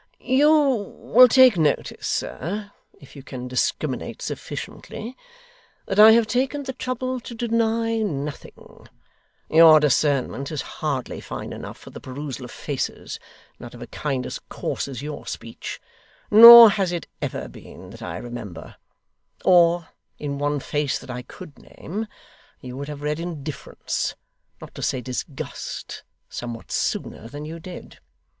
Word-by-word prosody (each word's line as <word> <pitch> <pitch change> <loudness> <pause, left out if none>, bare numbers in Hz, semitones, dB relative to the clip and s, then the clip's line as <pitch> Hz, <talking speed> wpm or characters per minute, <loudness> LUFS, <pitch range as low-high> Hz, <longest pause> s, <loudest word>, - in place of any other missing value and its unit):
'You 275 +4 +3 0.5
will 250 +3 +6
take 250 -6 +6
notice, 155 -2 0
sir 205 +7 -3 0.3
if 140 - -16
you 140 - -9
can 125 -2 -8
discriminate 125 0 -2
sufficiently 235 +4 -7 0.7
that 195 +1 -2
I 220 +1 +10
have 230 0 +4
taken 260 +5 -1
the 265 - -5
trouble 255 0 -3
to 235 0 -9
deny 230 0 0
nothing. 150 -8 -6 0.6
Your 160 -1 +8
discernment 140 -1 +1
is 150 - -3 0.2
hardly - - -3
fine - - -7
enough - - -8
for - - -13
the - - -9
perusal 135 -1 -6
of - - -10
faces, - - -5 0.4
not 120 0 -10
of 120 - -12
a - - -7
kind 135 -1 -3
as - - -5
coarse - - -3
as 135 -1 -7
your 150 0 -7
speech; 115 - -7 0.5
nor 230 +1 +12
has 195 -3 0
it 175 -2 -4 0.2
ever - - -4
been, - - -13
that - - -12
I - - -5
remember; 120 -8 -8 0.7
or, 175 -2 +4 0.3
in 140 -1 -4
one 145 0 0
face 145 +1 -1
that - - -9
I 125 0 -5
could 150 +5 -13
name, 215 +6 -7 0.5
you 125 -1 -9
would 140 +1 -6
have 145 -1 -7
read 150 +1 -1
indifference, 155 -4 -4 0.4
not - - -12
to - - -9
say 130 - -1
disgust, 130 +3 -6 0.3
somewhat 120 -1 -7
sooner 115 - -2
than 145 +5 -8
you 165 +2 -7
did. 180 +2 -11
155 Hz, 145 wpm, -23 LUFS, 135-220 Hz, 0.7 s, nor